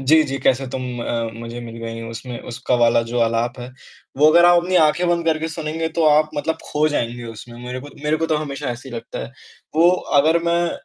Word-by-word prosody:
जी, 155 +4 +5
जी। 135 -1 -3
"कैसे 130 0 +1
तुम 130 -1 -4 0.2
अ, 115 -1 -2
मुझे 115 +1 -7
मिल 115 -1 -8
गई" 115 0 -5
उसमें 115 +1 -7
उसका 125 +1 -1
वाला 115 0 +4
जो 115 +1 -3
आलाप 115 +2 0
है, 125 +1 -7 0.5
वो 150 +3 +5
अगर 170 +2 +6
आप 175 0 +6
अपनी 185 +1 0
आँखें 160 +3 +3
बंद 170 -1 +1
करके 160 0 +1
सुनेंगे 160 0 -3
तो 165 0 0
आप 155 +1 +4
मतलब 155 +2 -2
ख़ो 150 +1 +1
जाएँगे 120 -4 -2
उसमें। 120 +1 -10
मेरे 125 +1 -5
को 145 - -10 0.2
मेरे 150 +1 +2
को 165 +1 -1
तो 155 - +1
हमेशा 145 -3 -4
ऐसे 120 +3 -7
ही 120 - -8
लगता 115 - -7
है। - - -11 0.4
वो 170 +2 +6 0.3
अगर 160 +3 +3
मैं 170 0 +1
140 Hz, 225 wpm, -21 LUFS, 120-160 Hz, 0.5 s, अगर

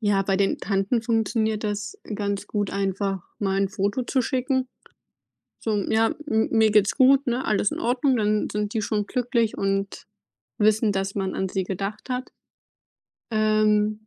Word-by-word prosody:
ja, 205 -3 +2
bei 195 0 0
den 195 0 +1
Tanten 200 +3 0
funktioniert 220 -1 0
das 210 - -3 0.2
ganz 200 0 -2
gut, 205 -2 -1
einfach 195 -1 -1 0.2
mal 195 -1 0
'n 195 - +1
Foto 200 +4 -1
zu 260 0 +1
schicken. 260 +1 0 1.0
So: 210 -2 +1
„Ja, 225 0 +2 0.2
m 220 0 +2
mir 220 -1 +4
geht's 210 -1 +3
gut, 270 +1 +5
ne, 245 +2 -1
alles 210 -1 +1
in - - -5
Ordnung.“ 250 +2 +2
Dann 210 -1 +1
sind 210 0 -2
die 220 - -1
schon 210 0 -1
glücklich 240 -3 0
und 195 0 -2 0.5
wissen, 215 0 +3
dass 195 +1 -2
man 190 -1 -2
an 190 - -1
sie 190 0 -2
gedacht 195 +6 -5
hat. 255 0 -3 1.0
Ähm, 215 0 +2
210 Hz, 160 wpm, -24 LUFS, 200-225 Hz, 1.0 s, gut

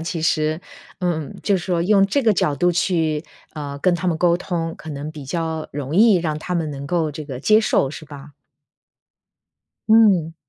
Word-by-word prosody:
其 165 0 -4
实 155 0 0 0.4
嗯， 170 -5 -2
就 200 - +3
是 180 - -5
说 175 -3 0
用 195 +3 +4
这 205 +8 +1
个 230 -5 +3
角 150 -6 0
度 175 +5 +2
去， 160 -3 0 0.3
呃， 145 -2 -6
跟 175 +5 +2
他 180 +1 -1
们 165 -2 -1
沟 175 0 +3
通， 165 -2 -3
可 160 - -9
能 145 +1 -6
比 150 -3 -9
较 160 +1 -3
容 145 +1 -5
易 215 +1 +6
让 160 -3 -1
他 180 +2 -2
们 165 -2 -1
能 140 0 -7
够 160 -3 0
这 155 +1 -7
个 135 -3 -7
接 215 - +4
受， 140 - +1
是 145 +2 -9
吧？ 145 -1 -11 1.6
嗯。 195 -8 +4
165 Hz, 205 characters per minute, -21 LUFS, 150-180 Hz, 1.6 s, 易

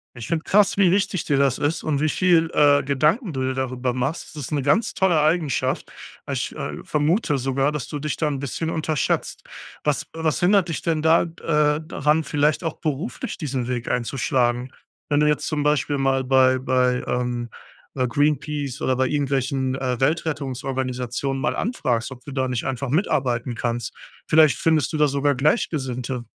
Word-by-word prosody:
Ich 120 -2 -7
finde 165 -1 -1
krass, 205 0 +3
wie 190 -3 +5
wichtig 195 -1 0
dir 140 - +1
das 135 -2 +2
ist 145 +3 -1
und 150 -3 0
wie 155 - +2
viel, 170 -1 +3
äh, 145 -1 +5
Gedanken 155 - +1
du 130 - -3
dir 130 0 0
darüber 130 -1 -2
machst. 135 +6 -3
Das 150 - -6
ist - - -7
'ne 145 -2 0
ganz 195 - +2
tolle 175 -5 +2
Eigenschaft. 155 -1 0 0.4
Ich, - - -3
äh, - - -5
vermute 150 +1 +1
sogar, 135 +2 0
dass 150 -3 -4
du 150 - -5
dich 150 0 -3
da 155 - 0
'n 140 -2 -2
bisschen 140 +4 -3
unterschätzt. 155 -2 -1 0.4
Was 150 -2 0
was 160 -1 -1
hindert 185 0 +3
dich 165 - -3
denn 160 -2 0
da 160 +2 +4
d 165 0 -13
äh, 150 -1 +2
daran, 155 0 +1
vielleicht 150 +3 +1
auch 165 - -3
beruflich 160 - -4
diesen 135 -7 -3
Weg 120 -2 -3
einzuschlagen? 125 0 0 0.4
Wenn 145 -1 +2
du 150 - +3
jetzt 150 -1 +1
zum 155 -2 -1
Beispiel 145 -1 +1
mal 135 -1 +1
bei 130 0 +4
bei, 125 -1 +1
ähm, 120 -1 -2 0.5
äh, 130 -2 0
Greenpeace 145 0 -1
oder 130 - +1
bei 130 +1 +1
irgendwelchen, 135 -2 -1
äh, 125 -3 -2
Weltrettungsorganisationen 135 -3 -2
mal 150 - 0
anfragst, 130 - -1
ob 125 -1 -11
du 145 - -8
da 130 -1 -1
nicht 125 -2 -2
einfach 135 0 -3
mitarbeiten 125 - 0
kannst. 120 +1 -3 0.3
Vielleicht 155 -4 +5
findest 160 -1 +1
du - - 0
da 150 0 +4
sogar 140 0 +1
Gleichgesinnte. 130 - -1
140 Hz, 180 wpm, -23 LUFS, 130-155 Hz, 0.5 s, wie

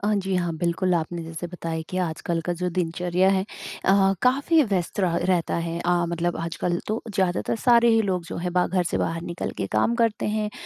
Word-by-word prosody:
हाँ, 210 0 +2
जी 190 -1 -1
हाँ, 175 -2 0
बिल्कुल, 175 +2 0
आपने 170 +1 -2
जैसे 165 +1 -6
बताया 165 -2 -4
कि 185 - -5
आजकल 165 -1 -1
का 175 - +1
जो 180 0 -1
दिनचर्या 180 +2 +1
है, 190 -1 +2 0.4
अ, 195 0 +4
काफ़ी 280 +5 +4
व्यस्त 190 -7 -2
रहा 175 -3 +1
रहता 175 -1 +1
है। 170 0 -2
अ, 175 - 0 0.2
मतलब 170 0 -1
आजकल 170 +1 -2
तो 215 +2 -1
ज़्यादातर 190 +2 0
सारे 235 -1 +5
ही 225 0 +5
लोग 185 -4 -1
जो - - -6
है 175 +1 -2
बा 180 0 +3
घर 185 0 +1
से - - 0
बाहर 165 0 -1
निकल 170 0 -4
के 100 - -1
काम 110 - +2
करते 225 -2 +1
हैं, 215 -1 -1
180 Hz, 215 wpm, -24 LUFS, 170-195 Hz, 0.4 s, सारे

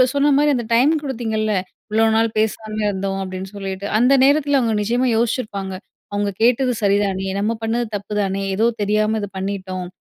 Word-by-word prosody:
சொன்ன 285 +1 +3
மாரி 295 0 +3
அந்த 240 - -2
டைம் 260 +6 +5
குடுத்தீங்கல்ல. 220 -5 -1 0.4
"இவளோ 220 +1 +3
நாள் 225 0 +3
பேசாம 215 0 -1
இருந்தோம்" 195 -1 -2
அப்பிடின்னு 190 +1 -6
சொல்லிட்டு, 195 0 -5
அந்த 250 +3 +4
நேரத்தில 285 0 +3
அவுங்க 230 -3 +1
நிச்சயமா 240 +5 +1
யோசிச்சிருப்பாங்க. 215 -5 -2 0.4
"அவங்க 205 0 0
கேட்டது 250 +1 +3
சரிதானே! 195 -1 +1
நம்ம 210 +3 0
பண்ணது 230 +1 0
தப்பு 205 +1 -5
தானே! 195 0 -1
ஏதோ 225 +3 +3 0.2
தெரியாம 215 +1 +1
இது 205 - -4
பண்ணிட்டோம். 190 -2 -4
215 Hz, 160 wpm, -20 LUFS, 195-240 Hz, 0.4 s, டைம்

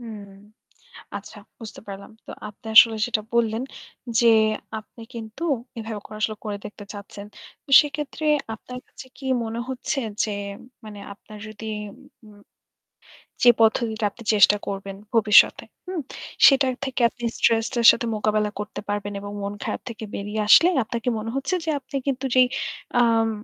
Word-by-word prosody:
হুম। 215 -4 -9 0.9
আচ্ছা - - -12 0.2
বুঝতে 225 -3 -10
পারলাম। 200 +2 -9
তো - - -9 0.2
আপনি 210 +2 -15
আসলে 225 0 +9
যেটা 235 -3 -1
বললেন 230 0 +1 0.6
যে 235 - +4 0.5
আপনি 215 +2 -16
কিন্তু 230 +5 -8 0.3
এভাবে 220 -1 -5
করে 215 - -9
আসলে 215 0 0
করে 205 -1 -3
দেখতে 210 0 -9
চাচ্ছেন। 200 0 -9 0.4
তো - - -22
সেইক্ষেত্রে 300 +1 -5 0.3
আপনার 250 +3 -9
কাছে - - -12
কি 275 - -10 0.2
মনে 225 +1 -4
হচ্ছে 260 +2 -2 0.2
যে 215 - -2 0.5
মানে 210 -1 -9
আপনার 210 +1 -14
যদি 215 +1 -10 0.6
ম 205 -1 -18 1.0
যে 245 - +9
পদ্ধতিটা 225 0 +2
আপনি 230 - -14
চেষ্টা 205 0 +6
করবেন 195 0 -5 0.2
ভবিষ্যতে। 215 -2 +5 0.2
হুম? 365 -3 -3 0.5
সেটা 275 -1 +5 0.2
থেকে 265 -1 -4
আপনি 240 0 -11
স্ট্রেসটার 230 +1 +2
সাথে 235 - -3
মোকাবেলা 210 0 0
করতে 210 0 -6
পারবেন 205 0 -3
এবং 205 0 -7
মন 200 +1 -4
খারাপ - - -3
থেকে 225 -2 -8
বেরিয়ে 210 +2 -3
আসলে 335 +10 +8 0.2
আপনার 235 +1 -4
কি 250 - +1
মনে 220 +1 -4
হচ্ছে 275 +6 -1
যে 325 - -1
আপনি 265 +2 -7
কিন্তু 275 -1 -2
যেই 255 -1 +6 0.5
আম 225 -1 +3
225 Hz, 155 wpm, -23 LUFS, 210-245 Hz, 1.0 s, আসলে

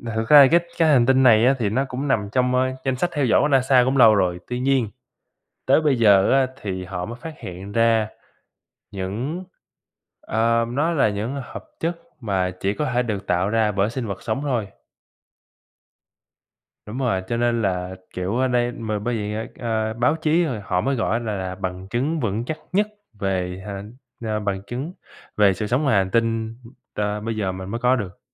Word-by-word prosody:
thực 110 0 -2
ra 150 - +10
là 135 - +8
cái 170 - +6 0.2
cái 165 - +4
hành 130 -5 +5
tinh 130 +1 +4
này 115 -2 +6
á 135 +2 +4
thì 105 - +1
nó 130 +6 0
cũng 135 +3 -4
nằm 105 -7 0
trong, 125 0 +1
ờ, 130 0 +2
danh 130 -1 +1
sách 175 +7 0
theo 145 -3 +1
dõi 120 - +4
của 145 - +3
NASA 130 -2 +4
cũng 130 +2 +1
lâu 110 -4 +7
rồi 90 -2 +1
tuy 125 0 -3
nhiên, 130 -4 +1 0.8
tới 135 +4 +5
bây 150 -4 +2
giờ 100 -4 +5
á 135 -1 +4 0.2
thì 95 -2 -4
họ 90 -1 -5
mới 120 - -7
phát 160 +3 -7
hiện 95 +3 -8
ra 115 -1 +3 0.8
những 110 - -4 0.8
ờ, 115 +1 +1
nó 145 +7 0
là 145 -8 +3
những 110 +7 -3
hợp - - -9 0.2
chất 165 +1 -2 0.2
mà 95 -5 0
chỉ 100 +1 0
có 150 - -2
thể 125 - +3
được 105 -4 -4
tạo 90 +2 +1
ra 110 -1 +2
bởi 100 +2 +1
sinh 120 -1 -4
vật 100 -2 -6
sống 115 +4 -2
thôi. 120 -8 -1 2.2
Đúng 110 +4 -6
rồi, 115 -8 0
cho 120 - -1
nên 120 -1 +1
là, 90 -1 -2 0.2
kiểu, 90 +4 -2
ở 130 +1 +2
đây 120 -1 +1
mà 110 -3 -3
bởi 120 +3 -2
vậy 105 -1 -3
á, 110 +1 -3
ờ, 110 -2 -1
báo 125 +6 +2
chí 160 +2 +2
rồi 125 -9 -3
họ 90 -2 0
mới 135 +6 0
gọi 110 - 0
á 115 - +2
là 110 -3 -3
là 95 -1 -4
bằng 95 0 -5
chứng 140 +9 -1
vững 110 -1 -1
chắc 155 +5 -4 0.2
nhất 205 +3 +3 0.3
về 95 -1 -2
hà 100 -1 -5 0.4
ờ, 110 -1 -1
bằng 100 -2 -2
chứng 130 - -5 0.4
về 105 -2 +5
sự 105 - -3
sống 125 +7 +1
ngoài 135 -8 +2
hành 95 -1 +1
tinh, 115 0 0 0.4
ờ, 105 0 -2
bây 115 +1 -3
giờ 95 -3 -1
mình 95 0 -7
mới 115 +3 -4
có 125 +1 +3
được. 95 -6 -5
115 Hz, 210 wpm, -22 LUFS, 100-130 Hz, 2.2 s, ra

